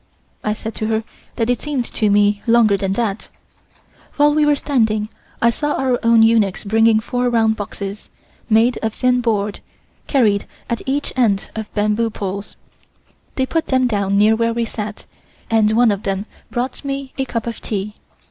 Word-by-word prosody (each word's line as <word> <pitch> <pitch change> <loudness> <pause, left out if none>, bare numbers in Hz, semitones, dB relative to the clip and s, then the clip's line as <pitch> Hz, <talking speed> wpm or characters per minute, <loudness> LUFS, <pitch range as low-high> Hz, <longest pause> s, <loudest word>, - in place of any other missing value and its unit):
I 210 - 0
said 220 +1 -6
to 215 - -2
her 220 0 0 0.3
that 225 - 0
it 245 - -1
seemed 285 -5 -2
to 215 -2 0
me 205 0 +3
longer 230 -3 +5
than 195 -1 -1
that. 215 -2 -2 0.9
While 295 0 +4
we 300 0 +3
were 295 - +4
talking 220 -7 0 0.3
I 235 - +5
saw 295 +4 -2
our 255 -2 0
own 230 -1 +5
eunuchs 225 -4 +2
bringing 225 +1 +3
four 245 +2 -1
round 225 -2 +2
boxes, 200 -1 -6 0.4
made 230 +2 +3
of 220 -1 -2
thin 250 -1 +2
board, 210 -3 -1 0.5
carried 215 -8 +2 0.2
at 235 - -1
each 280 +2 -1
end 215 -6 +1
of 220 -1 -5
bamboo 210 +2 +1
poles. 200 -1 -5 0.8
They 260 - +1
put 325 +4 -1
them 260 -1 +2
down 200 -4 0
near 215 +2 +5
where 230 0 0
we 235 -1 0
sat, 215 -1 -6 0.5
and 220 -1 +3
one 235 0 +4
of 200 -1 -2
them 195 0 -2 0.2
brought 250 +4 -3
me 275 -1 -4
a 265 - +1
cup 230 -3 -3
of 235 -1 -5
tea. 210 0 -3
225 Hz, 175 wpm, -19 LUFS, 210-245 Hz, 0.9 s, longer